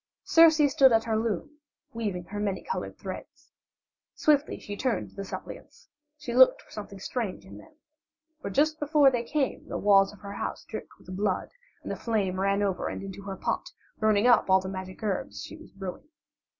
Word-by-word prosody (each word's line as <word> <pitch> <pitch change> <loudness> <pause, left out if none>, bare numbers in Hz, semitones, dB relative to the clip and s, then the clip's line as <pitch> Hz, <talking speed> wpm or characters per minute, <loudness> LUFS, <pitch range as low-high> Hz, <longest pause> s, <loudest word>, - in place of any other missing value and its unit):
Circe 315 -3 +6
stood 270 -3 +6
at 225 0 +4
her 225 -1 -1
loom, 230 +7 -2 0.3
weaving 205 -6 -3
her 205 +4 -6
many 200 -2 -2
colored 470 - -4
threads. - - -9 0.6
Swiftly 295 -1 +2
she 205 - -7
turned 255 +3 -1
to - - -22
the 195 - -5
suppliants; 470 - -9 0.3
she 295 -5 -6
looked 260 +1 +6
for - - -23
something 200 -1 -8
strange 210 -1 -4
in 190 - -11
them, 315 -1 -17 0.7
for 200 - -4
just 305 +9 +2
before 295 -2 +5
they 245 -2 0
came 275 +2 -2
the - - -3
walls 195 -1 +5
of 210 - -16
her 200 0 -7
house - - -4
dripped - - -8
with 185 - -9
blood 195 -1 -1 0.3
and - - -5
the - - -2
flame 200 -5 -1
ran 195 +1 +2
over 190 -3 -1
and - - -5
into 195 0 -7
her 195 -1 -6
pot, - - -2 0.3
burning 215 0 +3
up 245 -5 +5
all 190 0 +6
the 190 - -6
magic 185 +2 -7
herbs 200 -3 -3
she - - -9
was - - -14
brewing. 195 +9 -8
210 Hz, 195 wpm, -28 LUFS, 195-270 Hz, 0.7 s, Circe